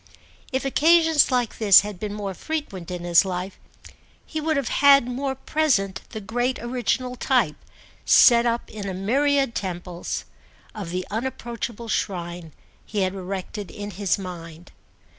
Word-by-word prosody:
If 265 0 -1
occasions 320 +2 +4
like 245 -3 -1
this 205 -4 +8
had 205 -2 -7
been 210 0 -4
more 200 -2 -4
frequent 200 - -5
in 180 -1 -5
his 175 +1 +5
life 185 0 -5 0.7
he 315 - -4
would 315 -1 0
have 275 -5 -1
had 280 -2 +6
more 265 +2 -2
present 260 -9 0
the 220 - -6
great 245 +5 -1
original 250 +1 -2
type, - - +1 0.5
set 235 -1 +6
up 235 0 -1
in 205 -2 -5
a 190 - -4
myriad 270 +6 +1
temples, 180 -3 -4 0.5
of 200 -5 -6
the 180 +1 -3
unapproachable 235 0 -4
shrine 175 -5 -3 0.3
he 210 -2 -3
had 185 0 0
erected 195 +1 -6
in 205 0 -7
his 195 -1 0
mind. 175 -3 -9
210 Hz, 145 wpm, -24 LUFS, 185-260 Hz, 0.7 s, this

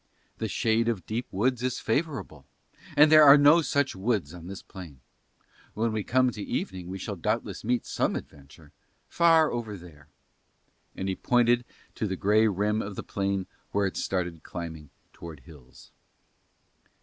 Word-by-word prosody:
The 110 - -2
shade 110 +3 +1
of 100 -7 -3
deep 115 +3 -3
woods 120 +5 0
is 125 0 -2
favourable, 115 - -3 0.5
but 150 +1 +7
there 155 -1 +9
are 140 0 +9
no 145 +4 +6
such 140 -5 0
woods 95 -6 -1
on 85 -1 -10
this 95 0 -8
plain. 85 -8 -11 0.8
When 115 +1 0
we 110 -1 -2
come 130 +2 +2
to 105 - -8
evening 95 -2 -4
we 95 +1 -5
shall 100 +2 -5
doubtless 85 - -3
meet 120 +1 0
some - - -1
adventure, 75 +2 -11 0.4
far 165 -2 +4
over 110 -4 -4
there." 80 -4 -15 0.9
And 95 - -4
he 95 - -1
pointed 120 +1 +2 0.3
to 110 - -3
the 95 - -2
grey 105 +4 +3
rim 105 +2 0
of 100 -2 -6
the - - -6
plain 100 -1 -2 0.3
where 100 0 +2
it 95 - -3
started 90 -4 -3
climbing 80 -4 -8 0.2
towards 80 -6 -11
hills. 65 -4 -16
105 Hz, 160 wpm, -27 LUFS, 90-120 Hz, 0.9 s, there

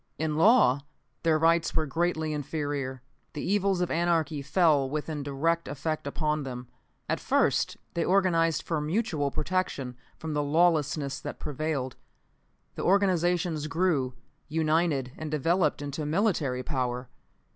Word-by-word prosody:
In 155 -1 -1
law, 155 - +5 0.4
their 160 -1 +3
rights 165 +1 +2
were 160 - +2
greatly 160 +1 -1
inferior. 145 -3 -3 0.3
The 150 - -5
evils 195 -1 +1
of 180 - 0
anarchy 165 -3 +1
fell 145 -1 +3
with 150 +1 -2
direct 155 +2 -1
effect 150 +2 -3
upon 150 +1 -1
them. 125 -2 -6 0.4
At - - 0
first, - - +1 0.2
they 170 - 0
organized 170 -4 +2
for 160 -3 -1
mutual 155 -3 0
protection 140 -7 -2 0.2
from 160 -1 -5
the 150 - +1
lawlessness 150 -2 +1
that - - -6
prevailed. 150 -3 -3 0.8
The - - -5
organizations 175 -4 +2
grew, 155 -6 0 0.3
united 155 -4 +1
and 155 -1 -4
developed 160 +2 +1
into 145 +2 -4
military 155 - +1
power. 125 -3 -2
155 Hz, 130 wpm, -28 LUFS, 140-170 Hz, 0.8 s, law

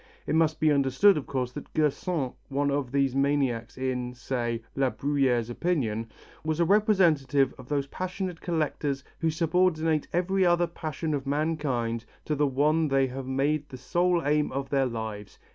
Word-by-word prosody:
It - - -1
must 160 -1 +2
be 155 -1 +4
understood, 140 +8 +4
of 150 - -4
course, 130 -2 -2
that - - -9
Gersaint, 150 -2 0 0.2
one 140 +1 0
of 140 -3 -1
these 135 -2 +1
maniacs 135 -5 0
in, 125 -1 -2
say, 120 -2 -3
La 135 -1 +2
Bruyère's 135 -5 +1
opinion, 115 -8 -1 0.3
was 155 0 -1
a 170 - +4
representative 165 - +3
of 130 - -12
those 140 -2 0
passionate 185 +3 -5
collectors 150 -4 -1 0.2
who 165 - +1
subordinate 160 -1 +1
every 190 +2 +1
other 175 -1 +4
passion 160 -2 -4
of 140 -1 -3
mankind 140 -6 -1 0.2
to 155 - -1
the 145 0 +2
one 150 +4 +2
they 135 -1 +3
have 130 0 -6
made 145 +3 0
the 130 - -8
sole 175 +6 +1
aim 150 +1 +2
of 135 0 -4
their 135 -2 +2
lives. 110 -3 -6
145 Hz, 165 wpm, -27 LUFS, 130-160 Hz, 0.3 s, be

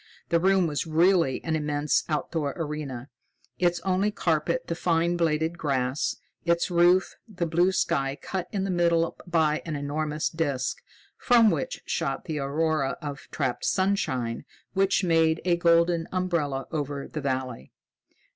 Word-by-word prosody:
The 170 - +3
room 190 +1 +3
was 150 0 -2
really 165 -3 +3
an 160 -1 -1
immense 150 -1 0
outdoor 150 -1 -1
arena, 150 -5 -5 0.5
its 175 -1 +2
only 190 +3 +1
carpet 180 +3 0
the - - -2
fine 170 0 +1
bladed 165 0 0
grass, 135 -1 0 0.3
its 170 +1 +1
roof 175 +2 +4
the 180 -5 -3
blue 175 +3 +2
sky 140 -7 0
cut 185 -2 -4
in 195 -3 -1
the 195 - -1
middle 170 -1 +2
by 160 -3 +2
an 160 -3 -4
enormous 150 +2 -2
disc 140 -6 -2 0.4
from 235 -4 +5
which - - -3
shot - - -2
the 155 -3 -3
aurora 145 0 0
of 145 -2 -7
trapped 130 -4 -2
sunshine 130 -13 0 0.3
which 195 0 +2
made 165 -2 +3
a 175 -1 +3
golden 170 0 +3
umbrella 165 -7 -1
over 145 -3 -3
the 155 - -5
valley. 130 -3 -3
165 Hz, 145 wpm, -26 LUFS, 145-175 Hz, 0.5 s, from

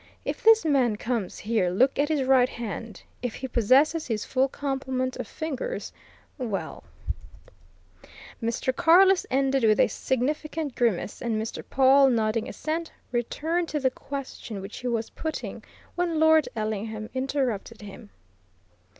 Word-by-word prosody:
If - - -3
this 450 -4 +6
man 260 -7 +3
comes 225 -3 -3
here 210 -4 0
look 250 +11 +2
at 295 +1 +2
his 300 -4 +1
right 260 -1 +4
hand! 230 -3 -6 0.2
If 245 -2 -3
he 265 - -5
possesses 265 +7 +3
his 220 -3 -2
full 265 +1 +2
complement 265 -2 -2
of 250 -4 -5
fingers, 315 - -4 0.5
well 225 -6 -4 0.8
" - - -20
Mr. 230 +3 -1
Carless 365 +5 +5
ended 270 0 +1
with 215 -1 +4
a - - +6
significant 295 +3 -2
grimace, 225 -5 -1
and 225 -2 -1
Mr. 220 +1 -5
Pawle, 270 +1 +5
nodding 220 -2 0
assent, 325 +1 -3 0.2
returned 320 +8 -1
to 300 - -1
the 260 -2 +1
question 260 -6 -7
which 195 +2 -8
he 250 - -4
was 230 -2 -2
putting 315 -1 -5 0.3
when 345 -2 -1
Lord 315 -1 +5
Ellingham 215 0 -3
interrupted 260 -5 -2
him. 200 - -11
255 Hz, 140 wpm, -26 LUFS, 225-290 Hz, 0.8 s, this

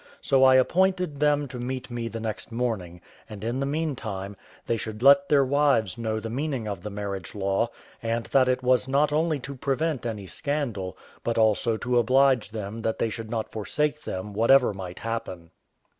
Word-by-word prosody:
So 135 -1 +3
I 130 0 +7
appointed 180 +2 +2
them 145 -1 +2
to 125 -1 -7
meet 130 +1 -4
me 120 -1 -3
the 115 0 -5
next 110 -2 -5
morning; 110 -8 -3 0.3
and, 105 -2 -8
in 120 +3 -2
the 135 - -1
meantime, 120 -11 -3 0.3
they 115 - 0
should 110 0 -5
let 140 +1 +6
their 140 -2 +5
wives 135 -8 +2
know 110 -2 -2
the 115 - -6
meaning 130 -1 -2
of 100 -4 -4
the 105 - -5
marriage 100 -3 -5
law; 100 +3 0 0.3
and 115 0 -1
that 130 -2 +4
it 130 0 0
was 125 0 +3
not 145 +2 +2
only 155 0 +1
to 140 - -6
prevent 135 0 -1
any 105 -4 -5
scandal, 115 - -3 0.3
but 115 -1 -1
also 110 +1 +2
to 125 +1 +1
oblige 130 -1 +3
them 110 0 -6
that 110 0 -1
they 115 - 0
should 115 0 -6
not 110 -1 -3
forsake 150 +7 -1
them, 95 -4 -5
whatever 120 +3 +4
might 95 -2 -7
happen. 100 -7 -5
120 Hz, 190 wpm, -26 LUFS, 110-140 Hz, 0.3 s, I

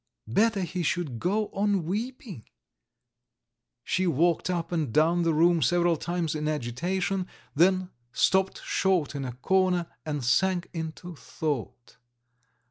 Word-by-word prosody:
Better 205 - +2
he 180 0 -3
should 160 -7 -1
go 205 - 0
on 200 -2 0
weeping! 220 - -4 1.4
She 185 +7 0
walked 170 +3 +2
up 170 -2 -2
and 160 -8 -1
down 165 +6 +3
the 165 -1 +2
room 165 +2 +3
several 175 +4 +3
times 170 0 -2
in 150 -1 -2
agitation, 175 +8 -1 0.3
then 185 +3 +3 0.2
stopped 190 +6 +1
short 185 -7 +1
in 140 -2 -4
a 125 - -5
corner 180 +6 +1 0.2
and 145 -5 -3
sank 175 +8 +1
into 165 +1 -6
thought. 125 -6 -5
175 Hz, 125 wpm, -27 LUFS, 155-185 Hz, 1.4 s, down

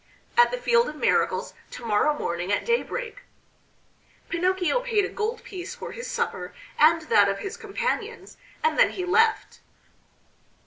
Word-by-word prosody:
"At 480 0 +6
the - - -3
Field 480 -1 +2
of 305 - -8
Miracles, - - +1 0.2
to 245 - -9
morrow 230 +8 +2
morning 175 -2 -3
at 205 - 0
daybreak." 475 +1 -2 1.1
Pinocchio 370 +6 +1
paid 455 -5 +1
a - - -5
gold 445 +2 -3
piece 370 -3 -7
for - - -7
his 480 0 -7
supper 465 - -3 0.2
and 320 +2 +5
that 205 -9 +4
of 195 - -1
his 395 - -6
companions 460 +1 -4 0.3
and 470 - +1
then - - +6
he 365 - -3
left. 445 +4 +2
415 Hz, 150 wpm, -25 LUFS, 305-470 Hz, 1.1 s, At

